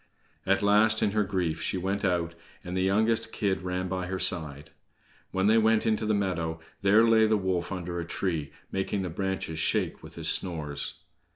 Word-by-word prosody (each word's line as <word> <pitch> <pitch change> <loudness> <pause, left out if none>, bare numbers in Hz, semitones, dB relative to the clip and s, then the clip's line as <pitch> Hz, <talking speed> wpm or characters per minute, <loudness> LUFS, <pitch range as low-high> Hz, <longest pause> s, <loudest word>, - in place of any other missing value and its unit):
At 100 +1 +2
last, 110 +2 +4
in 100 - +2
her 105 0 +1
grief, 90 -5 -2
she 95 - -1
went 95 +3 -2
out, 85 -3 0 0.3
and 90 +1 -5
the 95 - +1
youngest 110 +4 +2
kid 95 -2 -1
ran 90 0 -3
by 90 -1 -3
her 95 +1 -3
side. 80 -5 0 0.6
When 95 0 -1
they 110 +2 +5
went 110 0 +3
into 110 -1 +1
the 110 - +2
meadow, 85 -5 -2 0.2
there 105 +4 +5
lay 110 -1 +5
the 110 0 +3
wolf 95 -3 -2
under 90 -2 -4
a - - -2
tree, 85 -4 -3 0.2
making 95 +1 -2
the 90 - -4
branches 95 -3 -3
shake - - 0
with - - -12
his - - -3
snores. 75 -5 -1
95 Hz, 190 wpm, -28 LUFS, 85-105 Hz, 0.6 s, they